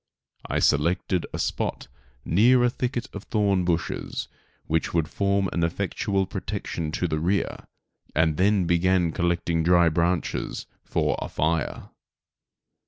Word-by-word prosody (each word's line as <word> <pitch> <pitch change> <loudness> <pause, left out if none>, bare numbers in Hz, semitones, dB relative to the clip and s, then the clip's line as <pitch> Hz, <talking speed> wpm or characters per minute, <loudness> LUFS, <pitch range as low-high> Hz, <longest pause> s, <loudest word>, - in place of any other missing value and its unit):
I - - 0
selected 85 +4 +1
a - - -4
spot - - -2 0.4
near 120 +8 +5
a 125 - +3
thicket 125 -1 -2
of 100 - -7
thorn 100 -4 +1
bushes, 85 -2 -2 0.4
which 80 +1 -1
would 80 -2 +2
form 100 +2 +1
an 85 - 0
effectual 95 +3 0
protection 95 -4 -4
to 90 - 0
the 80 -2 -1
rear, 95 +5 -1 0.5
and 80 -1 +2
then 95 0 +3
began 85 0 +2
collecting 85 -1 0
dry 85 0 +5
branches 85 +2 -1 0.2
for - - 0
a - - -4
fire. 80 +1 -1
90 Hz, 130 wpm, -25 LUFS, 85-100 Hz, 0.5 s, near